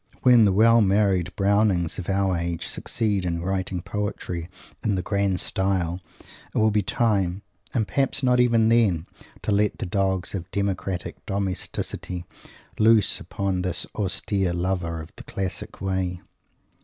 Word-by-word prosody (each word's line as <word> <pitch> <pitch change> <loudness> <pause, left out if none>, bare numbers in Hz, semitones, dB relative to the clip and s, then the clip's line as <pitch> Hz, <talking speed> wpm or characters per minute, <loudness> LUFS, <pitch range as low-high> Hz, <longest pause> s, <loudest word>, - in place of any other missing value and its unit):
When 120 -4 +7
the 100 - +4
well 115 +4 +5
married 95 -3 +2
Brownings 100 -4 +2
of 90 - -5
our 95 -1 +1
age 85 -1 -2
succeed 105 -4 -1
in 85 -1 -2
writing 95 -1 -2
poetry 90 -4 -4 0.3
in 105 -3 +1
the 90 - -2
"grand 100 -1 0
style," 95 -2 0 0.5
it - - 0
will 110 0 +4
be 105 0 +2
time 100 -3 0 0.3
and, 110 -5 0
perhaps, 135 0 +1
not 125 -1 +4
even 115 -2 +4
then 105 -9 +3 0.4
to - - -1
let 105 0 +2
the - - -4
dogs 95 -1 -1
of 90 -3 -5
democratic 95 -2 -3
domesticity 95 -2 -3 0.5
loose 110 -1 +4
upon 95 -2 -2
this 90 -1 -1
austere 95 -2 -1
lover 85 -2 -2
of 80 - -15
the - - -9
classic 95 -1 -4
way. 95 -2 -1
95 Hz, 145 wpm, -25 LUFS, 90-105 Hz, 0.5 s, When